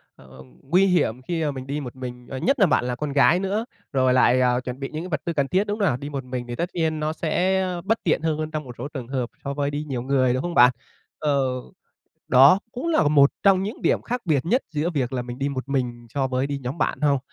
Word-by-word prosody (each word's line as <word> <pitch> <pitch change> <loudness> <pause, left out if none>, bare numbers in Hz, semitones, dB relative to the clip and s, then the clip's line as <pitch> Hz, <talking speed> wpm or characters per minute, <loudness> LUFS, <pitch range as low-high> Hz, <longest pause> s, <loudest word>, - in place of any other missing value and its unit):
ờ, - - -18
ừm, 65 -1 -16
nguy 185 +3 +5
hiểm 145 -9 +1
khi 165 +4 -2
mà 150 - 0
mình 130 -1 -7
đi 145 +2 -2
một 130 -3 -7
mình, 125 -1 -8
ờ, 135 - -5
nhất 270 - +1
là 195 - +6
bạn 155 - +2
là 125 0 -2
con 145 +1 -4
gái 165 +5 +5
nữa, 200 +4 -1 0.3
rồi 130 -1 +3
lại, 130 0 +4
à, 125 -1 +3
chuẩn 125 +1 -6
bị 135 - -4
những 155 +2 -5
cái 185 - -7
vật 155 -4 -2
tư 170 - -1
cần 140 -3 0
thiết, 190 +5 +1
đúng 205 +1 -2
không 200 - +2
nào? 120 - +1
Đi 145 +2 -7
một 140 -2 -4
mình 125 -1 -5
thì 120 - -5
tất 175 +5 -2
nhiên 160 -2 0
nó 155 +1 -1
sẽ 185 +4 +1 0.2
bất 225 +3 +1
tiện 160 - +1
hơn 160 -1 0
hơn 155 0 -4
trong 155 -1 -3
một 125 -3 -10
số 125 - -5
trường 130 -5 -7
hợp 130 -2 -2
so 140 0 -3
với 145 0 -1
đi 145 +1 -3
nhiều 130 -5 -4
người, 130 -1 +2
đúng 130 - -1
không 175 +2 -3
bạn? 125 -2 +7 0.5
Ờ, 145 -2 +1 0.9
đó 140 +9 +7
cũng 280 +8 -4
là 330 - +3
một 140 -2 +5
trong 195 -2 +4
những 210 +4 -5
điểm - - +2
khác 245 +1 -3
biệt 150 -5 +1
nhất 250 +9 +2
giữa 155 +3 -1
việc 135 -6 -2
là 125 -2 -1
mình 120 0 -8
đi 140 +1 0
một 135 -1 -5
mình 120 -3 -2
so 135 -2 +1
với 130 +1 -1
đi 140 0 -3
nhóm 130 +6 -5
bạn - - -1
hông? 145 -2 +3
140 Hz, 280 wpm, -24 LUFS, 130-165 Hz, 0.9 s, bạn